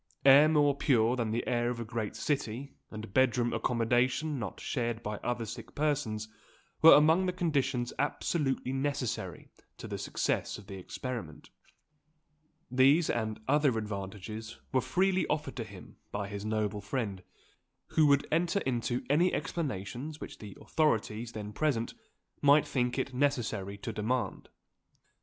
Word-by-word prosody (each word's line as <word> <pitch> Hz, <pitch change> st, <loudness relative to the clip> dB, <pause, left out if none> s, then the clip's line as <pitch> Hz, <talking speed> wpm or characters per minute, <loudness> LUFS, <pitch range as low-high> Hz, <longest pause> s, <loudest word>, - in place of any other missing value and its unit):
Air 140 Hz, +3 st, +8 dB
more 145 Hz, -2 st, +4 dB
pure 120 Hz, -4 st, +3 dB
than 115 Hz, -3 st, -1 dB
the 115 Hz, +2 st, -1 dB
air 120 Hz, -1 st, +1 dB
of 120 Hz, -1 st, -3 dB
a 115 Hz, -, -4 dB
great 110 Hz, -2 st, -4 dB
city, 135 Hz, -1 st, -2 dB, 0.2 s
and 110 Hz, -2 st, -8 dB
bed 130 Hz, -2 st, +4 dB
room 120 Hz, -1 st, +1 dB
accommodation 125 Hz, +5 st, +1 dB
not 105 Hz, -5 st, -5 dB
shared 120 Hz, -3 st, -2 dB
by 105 Hz, -1 st, -3 dB
other 120 Hz, 0 st, -2 dB
sick 115 Hz, +2 st, -8 dB
persons, 135 Hz, -8 st, -1 dB, 0.5 s
were 165 Hz, -, +10 dB
among 160 Hz, +5 st, +5 dB
the -, -, +2 dB
conditions 140 Hz, -8 st, 0 dB
absolutely 140 Hz, -2 st, 0 dB
necessary 135 Hz, -3 st, -3 dB, 0.3 s
to -, -, -8 dB
the -, -, -5 dB
success -, -, -1 dB
of 105 Hz, -, -12 dB
the 100 Hz, -, -9 dB
experiment. 110 Hz, -, -6 dB, 1.2 s
These, 135 Hz, +6 st, +5 dB
and 110 Hz, -2 st, -2 dB
other 145 Hz, -3 st, +3 dB
advantages, 105 Hz, +2 st, -5 dB
were 130 Hz, -, +3 dB
freely 190 Hz, +4 st, +1 dB
offered 150 Hz, -3 st, -2 dB
to 115 Hz, -, -2 dB
him 100 Hz, -4 st, -12 dB
by 100 Hz, -1 st, -3 dB
his 100 Hz, 0 st, -5 dB
noble 105 Hz, -1 st, -1 dB
friend, 100 Hz, -3 st, -3 dB, 0.7 s
who 155 Hz, -1 st, +4 dB
would 140 Hz, -1 st, +4 dB
enter 175 Hz, +4 st, +2 dB
into 120 Hz, -1 st, -1 dB
any 165 Hz, +6 st, +3 dB
explanations 140 Hz, -, -4 dB
which -, -, -8 dB
the 105 Hz, -3 st, -10 dB
authorities 115 Hz, -6 st, 0 dB
then 105 Hz, -1 st, -6 dB
present 125 Hz, -4 st, 0 dB, 0.5 s
might 145 Hz, +1 st, +6 dB
think 125 Hz, -1 st, -1 dB
it 130 Hz, 0 st, -2 dB
necessary 120 Hz, -8 st, -1 dB
to 115 Hz, +3 st, -5 dB
demand. 115 Hz, +4 st, -2 dB
125 Hz, 145 wpm, -31 LUFS, 110-145 Hz, 1.2 s, were